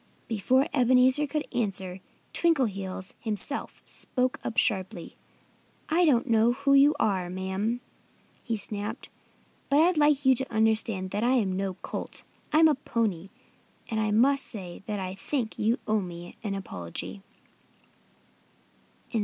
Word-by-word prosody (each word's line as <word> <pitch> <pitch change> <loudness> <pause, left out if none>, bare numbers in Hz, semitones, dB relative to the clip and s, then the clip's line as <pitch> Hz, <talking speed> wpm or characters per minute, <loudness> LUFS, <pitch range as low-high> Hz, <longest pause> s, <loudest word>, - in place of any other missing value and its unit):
Before 250 +5 +2
Ebenezer 255 +2 +4
could 300 +1 -3
answer 195 -6 -2
her, - - -21 0.3
Twinkleheels 200 - 0
himself 225 +6 -4
spoke 255 0 0
up 230 - -4
sharply. 190 -7 0 0.7
"I 340 +3 +4
don't 250 -6 +3
know 230 0 +4
who 275 +2 +1
you 280 +2 +6
are, 185 -4 +1
madam," 190 +6 -2 0.6
he 230 -3 -2
snapped. 210 +3 -4 0.6
"But 285 - +4
I'd 340 +1 +4
like 295 -2 +3
you 265 - +7
to 260 +1 -3
understand 220 -4 +1
that 205 +2 -1
I'm 235 -7 +2
no 190 -1 -2
colt. - - -5 0.3
I'm 315 +1 +6
a 310 - +4
pony. 220 - -2 0.6
And 220 - 0
I 215 0 +1
must 265 +6 +3
say 185 -6 -8
that 210 -2 -2
I 185 -1 -4
think 230 +3 -3
you 225 +4 +2
owe 215 -1 +2
me 175 -1 -8
an 200 -3 -2
apology." 135 - -5
225 Hz, 135 wpm, -27 LUFS, 195-265 Hz, 0.7 s, you